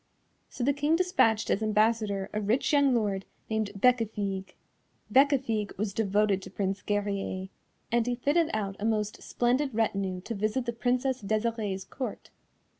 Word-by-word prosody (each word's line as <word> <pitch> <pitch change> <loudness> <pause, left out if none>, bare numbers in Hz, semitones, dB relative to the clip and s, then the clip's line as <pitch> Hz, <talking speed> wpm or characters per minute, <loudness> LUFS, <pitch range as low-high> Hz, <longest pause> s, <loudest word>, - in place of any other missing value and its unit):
So 245 - -5
the 280 +3 +3
King 295 +3 +2
despatched 230 -12 +2
as 210 - +1
ambassador 215 -2 +1
a 215 - -1
rich 225 +9 +1
young 280 -3 +4
lord 200 -4 0 0.3
named 220 -1 0
Bécafigue. 205 -4 +1 0.6
Bécafigue 260 -6 +2
was 200 0 -2
devoted 205 -2 +2
to - - -9
Prince 195 0 -2
Guerrier, 200 -2 -2 0.4
and 235 0 +2
he 245 - +1
fitted 295 +6 +2
out 205 -3 -2
a - - -6
most 215 -1 -1
splendid 255 +1 0
retinue 195 -4 0
to 230 - -5
visit 215 +4 -1
the 235 - -2
Princess 250 +2 0
Desirée's 215 -2 -1
Court. 245 +3 -6
220 Hz, 150 wpm, -28 LUFS, 200-245 Hz, 0.6 s, young